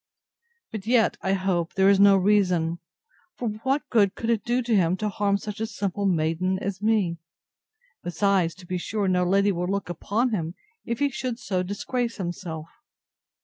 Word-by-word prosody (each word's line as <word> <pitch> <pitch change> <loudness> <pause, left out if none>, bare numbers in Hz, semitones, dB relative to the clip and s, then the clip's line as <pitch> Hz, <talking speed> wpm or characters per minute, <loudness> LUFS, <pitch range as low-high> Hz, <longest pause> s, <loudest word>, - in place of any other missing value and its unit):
But 215 -1 -6
yet, 235 -2 +3
I 190 - 0
hope, 185 -3 -1
there 190 0 +4
is 200 -1 +5
no 200 -1 +7
reason; 180 -4 +2 0.6
for 240 - -2
what 270 +3 0
good 205 -4 +3
could 230 0 -1
it 225 -3 0
do 245 +1 0
to 235 -2 +1
him 180 -2 +2
to 210 +1 -1
harm 200 0 +1
such 210 +1 -7
a 220 - -1
simple 200 -2 -2
maiden 175 +2 +1
as 195 0 -4
me? 205 -6 +1 0.8
Besides, 175 -1 +1
to 185 - -14
be 180 +1 -3
sure 205 +2 -2
no 180 -1 +2
lady 195 +3 +3
would 180 -1 -2
look 200 -2 -2
upon 215 +8 -1
him, 170 -4 -2 0.3
if 235 -1 -2
he 285 0 +1
should 255 -3 -3
so 185 -6 -2
disgrace 230 +5 -3
himself. 175 -4 -5
195 Hz, 180 wpm, -25 LUFS, 180-215 Hz, 0.8 s, no